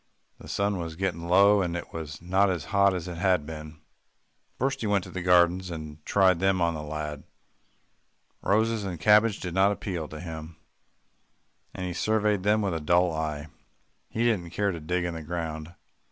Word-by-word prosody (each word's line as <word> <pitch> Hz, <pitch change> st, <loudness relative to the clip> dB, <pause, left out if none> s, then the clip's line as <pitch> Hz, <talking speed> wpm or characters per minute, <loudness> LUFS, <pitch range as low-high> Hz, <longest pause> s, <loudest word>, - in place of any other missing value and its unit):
The -, -, -12 dB
sun 100 Hz, -1 st, 0 dB
was 80 Hz, -1 st, -5 dB
getting 85 Hz, -2 st, -2 dB
low, 100 Hz, +3 st, +6 dB
and 85 Hz, -2 st, -1 dB
it 85 Hz, -, -8 dB
was 80 Hz, -1 st, -7 dB
not 95 Hz, +3 st, +3 dB
as 85 Hz, -6 st, -2 dB
hot 100 Hz, -1 st, +4 dB
as 90 Hz, -1 st, -4 dB
it 85 Hz, -1 st, -6 dB
had 90 Hz, -5 st, +2 dB
been. 75 Hz, -1 st, -9 dB, 0.8 s
First 135 Hz, +2 st, -1 dB
he 110 Hz, -, -1 dB
went 100 Hz, -2 st, +2 dB
to -, -, -10 dB
the 95 Hz, -, -4 dB
gardens, 90 Hz, +1 st, +3 dB
and 75 Hz, -2 st, -8 dB
tried 95 Hz, -3 st, +4 dB
them 95 Hz, 0 st, +2 dB
on 85 Hz, -1 st, +2 dB
the 80 Hz, -, -5 dB
lad. 75 Hz, -1 st, -5 dB, 1.2 s
Roses 110 Hz, +1 st, +1 dB
and 90 Hz, -4 st, -5 dB
cabbages 105 Hz, +5 st, +4 dB
did 90 Hz, -2 st, -5 dB
not 95 Hz, +2 st, +4 dB
appeal 90 Hz, -6 st, -4 dB
to 75 Hz, -, -9 dB
him, 80 Hz, -2 st, -8 dB, 1.2 s
and 90 Hz, -, -4 dB
he 90 Hz, -, -3 dB
surveyed 105 Hz, +1 st, +1 dB
them 105 Hz, +2 st, +2 dB
with 100 Hz, -3 st, 0 dB
a 80 Hz, -, -3 dB
dull 85 Hz, +2 st, +3 dB
eye. 80 Hz, -1 st, -3 dB, 0.6 s
He 115 Hz, -, -1 dB
didn't 105 Hz, -8 st, +1 dB
care 100 Hz, +4 st, 0 dB
to 85 Hz, -, -5 dB
dig 85 Hz, +3 st, -1 dB
in 85 Hz, -, -2 dB
the 80 Hz, -, -6 dB
ground. 80 Hz, 0 st, -5 dB
90 Hz, 190 wpm, -27 LUFS, 80-100 Hz, 1.2 s, low